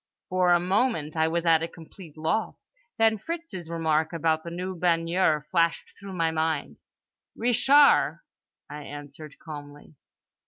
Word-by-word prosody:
—For 185 -1 +2
a 175 - +5
moment 185 - 0
I 160 0 +2
was 170 +1 -1
at 165 -1 +4
a 165 - -2
complete 165 -1 -14
loss—then 225 - -1
Fritz's 325 - -6
remark 160 -1 0
about 160 -1 0
the 170 - -6
new 180 +2 -4
baigneur 165 -2 +1
flashed 170 -2 0
through 195 -1 -9
my 165 -2 0
mind: 160 -2 -2 0.6
"Ree 245 +2 0
shar" 285 - +4 0.4
I 150 +1 -8
answered 145 +1 -10
calmly. 145 -1 -11
165 Hz, 135 wpm, -26 LUFS, 160-190 Hz, 0.6 s, a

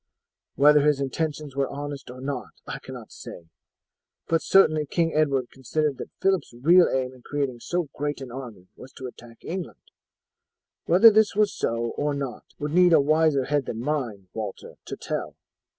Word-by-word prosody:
Whether 150 +1 +6
his 150 -1 +3
intentions 145 +1 -3
were 140 -1 0
honest 145 -2 -6
or 125 +1 -9
not 125 - -5
I - - -6
cannot - - -10
say, 85 -1 -11 0.8
but 165 0 +2
certainly 155 -6 +4
King 165 +2 0
Edward 140 -5 +1
considered 140 +2 -2
that - - -6
Phillip's 190 -10 0
real 170 +6 +6
aim 130 -1 -1
in 130 - -16
creating 140 -3 -3
so 175 +5 -2
great 145 +1 -3
an 130 -3 -8
army 120 -8 -9
was 130 - -12
to 130 - -9
attack 120 -2 -11
England. 180 -1 -5 1.1
Whether 195 +7 +8
this 215 -1 +3
was 210 -1 +2
so 115 0 -2
or 145 0 0
not 135 -3 -5
would 145 0 -4
need 180 0 +6
a 160 - +7
wiser 155 -1 +3
head 145 -1 0
than 115 - -4
mine, 120 -9 -3
Walter, 110 -3 -6
to - - -6
tell. - - -4
145 Hz, 170 wpm, -25 LUFS, 130-155 Hz, 1.1 s, Whether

